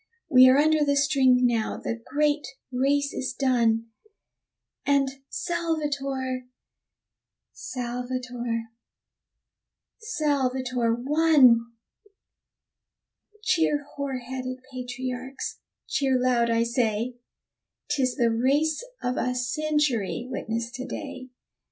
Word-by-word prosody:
We 255 -1 +9
are 260 - +5
under 310 +1 +4
the 285 -1 +2
string 270 -3 +4
now 230 -3 0
the - - -3
great 295 +2 0 0.2
race 280 +3 +1
is 260 - -3
done, 230 -4 +2 0.9
And 280 -1 +3 0.2
Salvator, 285 -7 -2 1.1
Salvator, 245 -1 -4 1.4
Salvator 260 - 0
won! 255 -4 +4 1.7
Cheer, 320 -7 +2
hoar 280 -2 -3
headed 255 +1 -6
patriarchs; 255 +1 -5 0.3
cheer 265 -2 +1
loud, 245 -2 +2
I 230 0 +3
say. 235 0 -1 0.7
'Tis 260 -4 +1
the 235 -4 +2
race 285 - +1 0.2
of 250 0 -1
a 250 0 0
century 250 -3 0
witnessed 230 -2 -4
to 255 - -5
day! 265 -2 -7
255 Hz, 90 wpm, -26 LUFS, 245-285 Hz, 1.7 s, We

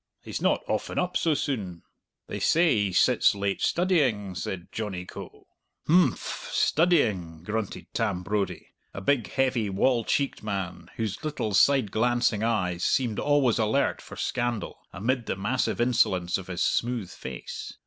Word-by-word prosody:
He's - - -5
not - - +2
often - - -2
up 180 0 0
so 160 -2 +2
soon." 100 - -3 0.4
"They - - -5
say 165 0 +4
he 100 -2 +1
sits 90 - +4
late 100 0 -2
studying," 135 - +1
said 90 0 -5
Johnny 95 -5 -4
Coe. - - -10 0.4
"H'mph, 165 -6 +2
studying!" 105 - +2
grunted 105 +1 -3
Tam 100 -6 -1
Brodie, 100 +1 -2 0.3
a 100 - -5
big, 125 +1 +1
heavy, 130 -5 +1
wall 115 +5 +2
cheeked 140 +5 -1
man, 100 -4 -4
whose 110 - -3
little, 145 -9 -2
side 130 -1 +4
glancing 120 -1 +1
eyes 90 -6 0
seemed 120 -5 +1
always 145 -6 +2
alert 110 +6 +1
for - - -11
scandal 120 -3 -2
amid 115 +4 -1
the - - -1
massive 105 +8 -1
insolence 95 -8 +2
of 95 - -10
his 90 -2 -1
smooth 115 -6 0
face. 65 -1 -7
110 Hz, 150 wpm, -27 LUFS, 95-130 Hz, 0.4 s, say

